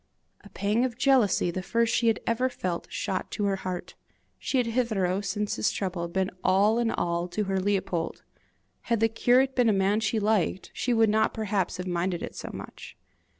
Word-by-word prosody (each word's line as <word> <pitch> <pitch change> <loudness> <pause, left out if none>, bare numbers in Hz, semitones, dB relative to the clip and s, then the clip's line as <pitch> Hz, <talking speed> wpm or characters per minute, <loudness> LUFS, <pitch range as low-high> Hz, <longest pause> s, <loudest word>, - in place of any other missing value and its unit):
A 205 - -13
pang 205 +5 0
of 245 -2 -2
jealousy, 245 -11 +3
the 185 - -3
first 230 +4 +1
she 235 - +2
had 225 0 +3
ever 250 +3 +1
felt, 180 -8 -4
shot 185 - -3
to 205 - -2
her 200 -1 +1
heart: 185 -2 -5 0.5
she 270 - -1
had 250 - +2
hitherto, 215 -6 0
since 205 +1 -2
his 110 - +1
trouble, 180 -3 -3
been 190 +2 -1
all 205 +5 +3
in 235 -1 +1
all 170 -3 -1
to 210 +4 -2
her 195 -1 -1
Leopold! 185 -4 -1 0.7
Had 230 -2 +2
the 225 - +4
curate 250 +4 +2
been 245 -3 +4
a - - +4
man 195 +2 +2
she 220 0 0
liked, 205 -3 0
she 250 - -1
would 225 -2 +4
not 220 0 +2
perhaps 205 -4 -1
have 180 - -5
minded 175 0 -1
it - - -6
so - - -7
much. - - -10
205 Hz, 195 wpm, -27 LUFS, 185-230 Hz, 0.7 s, the